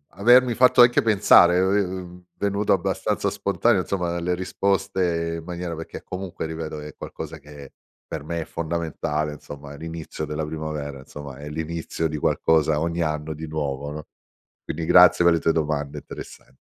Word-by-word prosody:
avermi 120 Hz, +4 st, +5 dB
fatto 125 Hz, +1 st, +6 dB
anche 120 Hz, 0 st, +6 dB
pensare 100 Hz, -5 st, +6 dB
è -, -, +4 dB
è, -, -, +3 dB, 0.2 s
ehm, 90 Hz, -1 st, -7 dB
venuto 100 Hz, 0 st, +1 dB
abbastanza 90 Hz, -, 0 dB
spontaneo 100 Hz, +1 st, +1 dB
insomma 90 Hz, -2 st, -2 dB
dalle 85 Hz, +1 st, -1 dB
risposte 95 Hz, -3 st, -1 dB
in -, -, -11 dB
maniera 90 Hz, -1 st, -4 dB
perché 80 Hz, +1 st, -8 dB
comunque 90 Hz, -2 st, -5 dB
ripeto 80 Hz, -1 st, -5 dB
è 75 Hz, 0 st, -9 dB
qualcosa -, -, -7 dB
che 75 Hz, -2 st, -12 dB, 0.3 s
per 75 Hz, -2 st, -6 dB
me 85 Hz, +1 st, -3 dB
è -, -, -5 dB
fondamentale, 80 Hz, -2 st, -2 dB
insomma, 75 Hz, -1 st, -10 dB
l'inizio 80 Hz, 0 st, -6 dB
della 75 Hz, +1 st, -3 dB
primavera, 75 Hz, -3 st, -5 dB
insomma, 70 Hz, 0 st, -9 dB
è 75 Hz, +1 st, -8 dB
l'inizio 80 Hz, +1 st, -3 dB
di 75 Hz, -, -3 dB
qualcosa 80 Hz, 0 st, +2 dB
ogni 85 Hz, +1 st, -1 dB
anno 75 Hz, -1 st, -2 dB
di 80 Hz, +1 st, -7 dB
nuovo, 70 Hz, -2 st, -3 dB
no, 75 Hz, +1 st, -7 dB, 0.6 s
quindi 80 Hz, +1 st, -4 dB
grazie 90 Hz, 0 st, +7 dB
per 85 Hz, -, +6 dB
le 85 Hz, -, +1 dB
tue 80 Hz, -, +2 dB
domande 75 Hz, -3 st, -2 dB
interessan -, -, -11 dB
80 Hz, 165 wpm, -24 LUFS, 75-90 Hz, 0.6 s, grazie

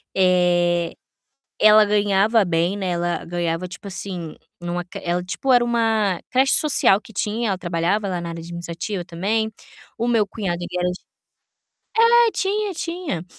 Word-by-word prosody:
Eh, 175 Hz, -2 st, +2 dB, 0.7 s
ela 215 Hz, 0 st, +7 dB
ganhava 205 Hz, +1 st, +2 dB
bem, 175 Hz, +2 st, 0 dB
né, 190 Hz, -2 st, -2 dB
ela 175 Hz, 0 st, -2 dB
ganhava 170 Hz, 0 st, -2 dB
tipo 180 Hz, +2 st, -10 dB
assim, 180 Hz, -4 st, -6 dB, 0.2 s
numa 175 Hz, 0 st, -3 dB, 0.2 s
ela 175 Hz, +1 st, -1 dB
tipo 260 Hz, +8 st, -1 dB
era 245 Hz, -1 st, +5 dB
uma 225 Hz, -5 st, +1 dB
creche 265 Hz, +2 st, +3 dB
social 275 Hz, -9 st, +4 dB
que 220 Hz, -, -16 dB
tinha, 215 Hz, +3 st, -1 dB
ela 190 Hz, -2 st, -1 dB
trabalhava 180 Hz, +4 st, -1 dB
lá 180 Hz, -2 st, -2 dB
na 170 Hz, -, -5 dB
área 165 Hz, -, -6 dB
administrativa 170 Hz, +3 st, -5 dB
também. 205 Hz, +6 st, -1 dB, 0.5 s
O 235 Hz, -, -1 dB
meu 225 Hz, -3 st, +2 dB
cunhado 195 Hz, -4 st, -3 dB
ele 175 Hz, -, -5 dB
era 180 Hz, 0 st, +1 dB
eng 180 Hz, -, -2 dB, 1.3 s
É, -, -, 0 dB
tinha, 410 Hz, +1 st, -1 dB
tinha. 335 Hz, -, -4 dB
190 Hz, 150 wpm, -22 LUFS, 175-220 Hz, 1.3 s, ela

